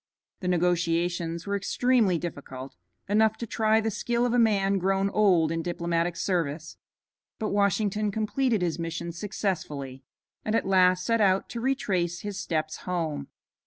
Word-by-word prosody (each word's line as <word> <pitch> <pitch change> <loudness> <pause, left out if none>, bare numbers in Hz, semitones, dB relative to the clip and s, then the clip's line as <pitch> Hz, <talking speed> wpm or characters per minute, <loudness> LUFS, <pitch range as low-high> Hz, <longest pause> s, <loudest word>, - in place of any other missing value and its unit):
The 185 - -4
negotiations 170 -1 0
were 200 0 -1
extremely 210 -1 +2
difficult, 140 -5 -7 0.3
enough 220 +2 +3
to 235 - -4
try 220 0 +2
the 225 0 -1
skill 235 +3 0
of 245 - 0
a 245 - +3
man 200 -3 +3
grown 195 +1 +1
old 180 -7 +3
in 165 0 -1
diplomatic 170 0 -1
service, 165 -4 -2 0.6
but 215 - -2
Washington 205 +1 +1
completed 220 +1 0
his 170 -2 -1
mission 165 +1 -4
successfully, 165 -8 -4 0.4
and 215 - 0
at - - +1
last 185 -1 +4
set 230 -1 +2
out 195 -1 +2
to 235 - -5
retrace 190 -10 0
his 205 -2 -5
steps 155 -2 -2
home. 160 -6 -3
185 Hz, 150 wpm, -27 LUFS, 170-215 Hz, 0.6 s, last